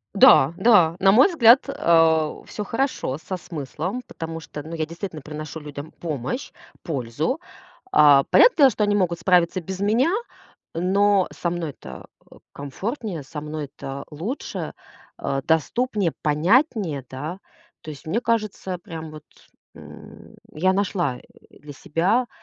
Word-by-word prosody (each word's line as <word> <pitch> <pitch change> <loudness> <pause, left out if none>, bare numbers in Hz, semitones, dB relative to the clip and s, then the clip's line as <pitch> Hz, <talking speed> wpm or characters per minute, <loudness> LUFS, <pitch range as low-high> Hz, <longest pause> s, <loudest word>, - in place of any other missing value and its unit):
Да, 195 - +7
да. 190 -6 +5
На 195 0 +5
мой 245 - +7
взгляд, 255 -6 +6
э, 165 - +3 0.2
всё 210 - -5
хорошо 230 - -2
со 160 +4 -6
смыслом. 175 - -5
Потому 165 -1 -6
что, 150 -1 -9
ну, 160 +2 -9
я 160 -1 -2
действительно 170 0 -7
приношу 155 +2 -7
людям 145 0 -9
помощь, 150 - -4 0.3
пользу. 150 - -2 0.5
Э, 145 -2 +7
понятное - - +6
дело, 275 -3 +7
что 215 -3 -1
они 205 0 +1
могут 175 -4 0
справиться 180 +1 +2
без 190 +3 -7
меня, 230 +10 +2 0.6
но 195 +3 +2
со 170 - -2
мной-то, 150 - -7 0.2
э, - - -14 0.2
комфортнее, 180 - -5
со 150 +2 -8
мной-то 145 -2 -7
лучше, 185 - -5 0.5
э, 135 0 -2
доступнее, 195 - 0
понятнее, 170 - +1
да. 150 +8 -6 0.4
То - - -10
есть 145 +2 -12
мне 220 +9 0
кажется, 215 -5 -2
прям 160 -5 -8
вот, 155 -1 -11 0.5
м, - - -13 0.2
я 185 +5 +2
нашла, 185 -9 -1
э, - - -15 0.4
для 145 -1 -11
себя 190 - 0
170 Hz, 140 wpm, -23 LUFS, 150-205 Hz, 0.6 s, Да